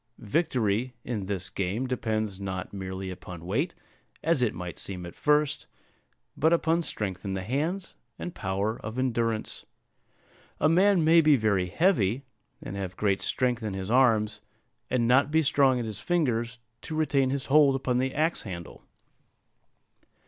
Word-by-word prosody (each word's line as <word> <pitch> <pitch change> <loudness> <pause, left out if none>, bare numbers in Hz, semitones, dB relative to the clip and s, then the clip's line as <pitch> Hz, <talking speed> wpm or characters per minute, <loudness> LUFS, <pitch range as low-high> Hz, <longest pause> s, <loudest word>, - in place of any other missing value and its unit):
Victory 125 -2 0
in 105 -6 -4
this 95 -2 -3
game 100 +7 -2
depends 110 -5 -2
not 95 -1 -5
merely 95 -1 -5
upon 90 -2 -9
weight, 140 - -1 0.5
as 160 -4 +2
it 120 -4 +1
might 90 -1 -6
seem 90 -2 -5
at 85 - -8
first, 150 -1 +1 0.7
but 160 +2 +3
upon 165 0 +2
strength 100 - -4
in 95 -2 -3
the 95 - -3
hands, 155 - -2 0.2
and 175 - -6
power 100 +3 -2
of 110 +3 -6
endurance. 115 -4 -1 1.0
A - - +4
man 185 +2 +4
may 165 +1 +6
be 150 -2 +5
very 100 -6 +1
heavy, 130 - +2 0.4
and 95 - -6
have 95 -2 -5
great 100 -2 +1
strength 125 -2 0
in 105 -3 -3
his 95 +2 -4
arms, 110 -5 +3 0.5
and 120 -2 +1
not 130 +4 +4
be 160 +1 +3
strong 135 -2 +4
in 120 - -2
his 110 -2 -5
fingers 120 -5 0 0.2
to 160 - -6
retain 140 -4 +2
his 140 0 -2
hold 140 -1 +5
upon 125 -2 0
the 130 +1 0
axe 160 +3 +1
handle. 85 -5 -8
120 Hz, 155 wpm, -27 LUFS, 100-145 Hz, 1.0 s, may